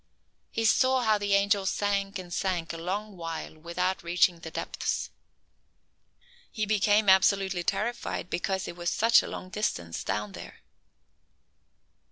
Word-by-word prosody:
He 225 Hz, -, -2 dB
saw 260 Hz, +3 st, +4 dB
how 215 Hz, -2 st, +3 dB
the 200 Hz, -1 st, +2 dB
angel 200 Hz, 0 st, +2 dB
sank 200 Hz, 0 st, 0 dB
and 180 Hz, -2 st, -8 dB
sank 175 Hz, -4 st, -1 dB
a -, -, -5 dB
long 200 Hz, +5 st, -4 dB
while 165 Hz, -2 st, -5 dB
without 175 Hz, +4 st, -2 dB
reaching 175 Hz, 0 st, +2 dB
the 160 Hz, -, -8 dB
depths. -, -, -3 dB, 1.4 s
He 215 Hz, -, -1 dB
became 210 Hz, 0 st, +3 dB
absolutely 190 Hz, -1 st, +4 dB
terrified 235 Hz, -3 st, -2 dB
because 190 Hz, +2 st, -2 dB
it -, -, -6 dB
was 175 Hz, 0 st, -2 dB
such 230 Hz, +1 st, +5 dB
a -, -, -7 dB
long 185 Hz, -, -7 dB
distance 85 Hz, -, -2 dB
down 105 Hz, +1 st, -2 dB
there. -, -, -10 dB
190 Hz, 140 wpm, -28 LUFS, 170-205 Hz, 1.4 s, such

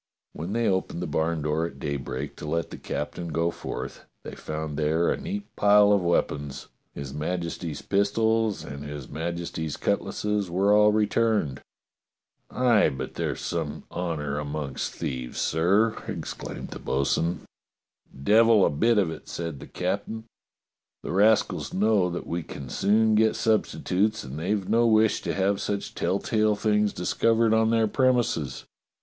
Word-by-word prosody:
When 85 Hz, +6 st, -5 dB
they 115 Hz, 0 st, +1 dB
opened 95 Hz, -1 st, 0 dB
the -, -, -2 dB
barn 80 Hz, -1 st, -1 dB
door 75 Hz, +2 st, 0 dB
at 70 Hz, -, -12 dB
daybreak 70 Hz, 0 st, -4 dB
to 75 Hz, -, -7 dB
let 85 Hz, +1 st, -1 dB
the -, -, -7 dB
captain 85 Hz, +4 st, -4 dB
go 85 Hz, +1 st, 0 dB
forth, -, -, -6 dB, 0.2 s
they -, -, -8 dB
found 75 Hz, -1 st, -5 dB
there 80 Hz, +3 st, +1 dB
a -, -, +1 dB
neat 200 Hz, +1 st, -4 dB
pile 105 Hz, 0 st, +6 dB
of 100 Hz, -2 st, +4 dB
weapons: 75 Hz, -5 st, -1 dB, 0.3 s
his 70 Hz, -1 st, -6 dB
Majesty's 85 Hz, 0 st, -3 dB
pistols 110 Hz, +2 st, +1 dB
and 70 Hz, +1 st, -7 dB
his 75 Hz, -3 st, -7 dB
Majesty's 80 Hz, -1 st, -4 dB
cut -, -, +1 dB
lasses 105 Hz, -3 st, -2 dB
were 95 Hz, +4 st, +3 dB
all 105 Hz, 0 st, +6 dB
returned. 105 Hz, -, +1 dB, 0.9 s
"Aye, 120 Hz, -8 st, +3 dB
but 65 Hz, -2 st, -6 dB
there's -, -, -3 dB
some -, -, -3 dB
honour 75 Hz, -5 st, -2 dB
amongst 75 Hz, -2 st, -4 dB
thieves, 65 Hz, -2 st, -4 dB
sir!" 100 Hz, +8 st, +2 dB
exclaimed -, -, -6 dB
the -, -, -8 dB
bo'sun. 80 Hz, +5 st, 0 dB, 0.8 s
"Devil 110 Hz, +2 st, +6 dB
a -, -, +2 dB
bit 115 Hz, +10 st, +2 dB
of 95 Hz, -6 st, +2 dB
it!" -, -, -9 dB
said 85 Hz, -5 st, -5 dB
the -, -, -10 dB
captain. 100 Hz, +5 st, -3 dB, 0.8 s
"The -, -, -4 dB
rascals 105 Hz, +4 st, +2 dB
know 100 Hz, -2 st, +3 dB
that 90 Hz, 0 st, -5 dB
we 85 Hz, +1 st, -2 dB
can 70 Hz, -4 st, -8 dB
soon 110 Hz, -, +3 dB
get 110 Hz, 0 st, +3 dB
substitutes, 110 Hz, -1 st, +1 dB
and 70 Hz, +2 st, -7 dB
they've 95 Hz, +3 st, -1 dB
no 115 Hz, +1 st, +3 dB
wish 110 Hz, -1 st, +3 dB
to -, -, -3 dB
have 100 Hz, +1 st, +1 dB
such 100 Hz, -1 st, -3 dB
telltale 105 Hz, +2 st, +1 dB
things 105 Hz, -1 st, +2 dB
discovered 115 Hz, +5 st, +2 dB
on 110 Hz, 0 st, +3 dB
their 115 Hz, -1 st, +3 dB
premises. 120 Hz, -, +1 dB
95 Hz, 155 wpm, -26 LUFS, 75-110 Hz, 0.9 s, pile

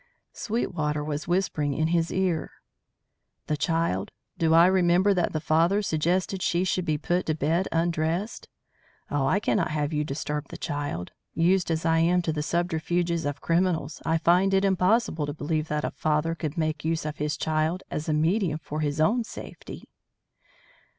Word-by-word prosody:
Sweetwater 160 Hz, -10 st, -2 dB
was 150 Hz, +1 st, -4 dB
whispering 165 Hz, -6 st, 0 dB
in 160 Hz, +2 st, +1 dB
his 170 Hz, -1 st, +1 dB
ear. 185 Hz, -4 st, 0 dB, 1.0 s
"The 155 Hz, -, 0 dB
child? 150 Hz, -, 0 dB, 0.3 s
Do 160 Hz, -1 st, +1 dB
I 165 Hz, +1 st, +8 dB
remember 185 Hz, +1 st, +4 dB
that 180 Hz, -3 st, 0 dB
the 155 Hz, -, -1 dB
father 165 Hz, +6 st, +2 dB
suggested 180 Hz, +3 st, 0 dB
she 175 Hz, +1 st, +1 dB
should 185 Hz, -1 st, 0 dB
be 155 Hz, -3 st, 0 dB
put 175 Hz, +4 st, -1 dB
to 155 Hz, -, +1 dB
bed 165 Hz, +5 st, 0 dB
undressed? 165 Hz, +4 st, -1 dB, 0.6 s
Oh, 140 Hz, -2 st, +1 dB
I 190 Hz, -, +2 dB
cannot 205 Hz, -4 st, +1 dB
have 150 Hz, 0 st, -1 dB
you 150 Hz, 0 st, +1 dB
disturb 150 Hz, 0 st, -4 dB
the -, -, -9 dB
child. 145 Hz, -, -4 dB, 0.2 s
Used 180 Hz, +2 st, +2 dB
as 165 Hz, 0 st, -1 dB
I 165 Hz, 0 st, +3 dB
am 175 Hz, +2 st, +3 dB
to 160 Hz, -, -1 dB
the 150 Hz, -, -2 dB
subterfuges 170 Hz, 0 st, -1 dB
of 145 Hz, 0 st, -4 dB
criminals 165 Hz, -3 st, 0 dB
I 160 Hz, 0 st, +1 dB
find 180 Hz, +4 st, +3 dB
it 195 Hz, +1 st, +3 dB
impossible 185 Hz, -4 st, +2 dB
to 145 Hz, -, -4 dB
believe 155 Hz, +1 st, -2 dB
that 150 Hz, 0 st, -1 dB
a -, -, -2 dB
father 155 Hz, +1 st, 0 dB
could 160 Hz, -1 st, -5 dB
make 155 Hz, -2 st, -1 dB
use 160 Hz, 0 st, -1 dB
of 150 Hz, -1 st, -4 dB
his 150 Hz, 0 st, -2 dB
child 160 Hz, +3 st, 0 dB
as 155 Hz, +1 st, -3 dB
a -, -, +2 dB
medium 160 Hz, +1 st, +1 dB
for 155 Hz, -1 st, -6 dB
his 150 Hz, -1 st, -1 dB
own 225 Hz, +10 st, +3 dB
safety." -, -, -9 dB
165 Hz, 175 wpm, -26 LUFS, 150-180 Hz, 1.0 s, I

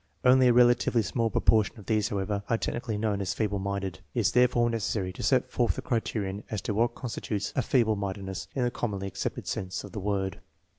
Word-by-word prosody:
Only 130 Hz, 0 st, +6 dB
a 120 Hz, -, +5 dB
relatively 120 Hz, -1 st, +4 dB
small 115 Hz, +2 st, 0 dB
proportion 110 Hz, -1 st, +2 dB
of 105 Hz, -, -12 dB
these, 105 Hz, -2 st, +1 dB
however, 100 Hz, 0 st, -2 dB
are 115 Hz, -, +3 dB
technically 115 Hz, -1 st, -3 dB
known 105 Hz, -2 st, 0 dB
as 95 Hz, -, -2 dB
feeble 105 Hz, -2 st, 0 dB
minded. 100 Hz, -2 st, -3 dB, 0.2 s
It -, -, +2 dB
is -, -, +2 dB
therefore 125 Hz, -1 st, +4 dB
necessary 105 Hz, -5 st, -1 dB
to -, -, -8 dB
set 130 Hz, -2 st, +2 dB
forth 120 Hz, -2 st, +1 dB
the -, -, -5 dB
criterion 105 Hz, -4 st, -2 dB
as 105 Hz, -, -2 dB
to 105 Hz, -, -1 dB
what 115 Hz, +3 st, +1 dB
constitutes 105 Hz, -4 st, -4 dB
a 130 Hz, -, +2 dB
feeblc 110 Hz, -4 st, +2 dB
inindedness 95 Hz, -1 st, -4 dB
in 130 Hz, -, +1 dB
the 120 Hz, -, +1 dB
commonly 100 Hz, -6 st, -3 dB
accepted 95 Hz, -, -4 dB
sense 95 Hz, +1 st, -3 dB
of -, -, -9 dB
that 105 Hz, -, -5 dB
word. 95 Hz, -1 st, -2 dB
105 Hz, 210 wpm, -28 LUFS, 100-120 Hz, 0.2 s, Only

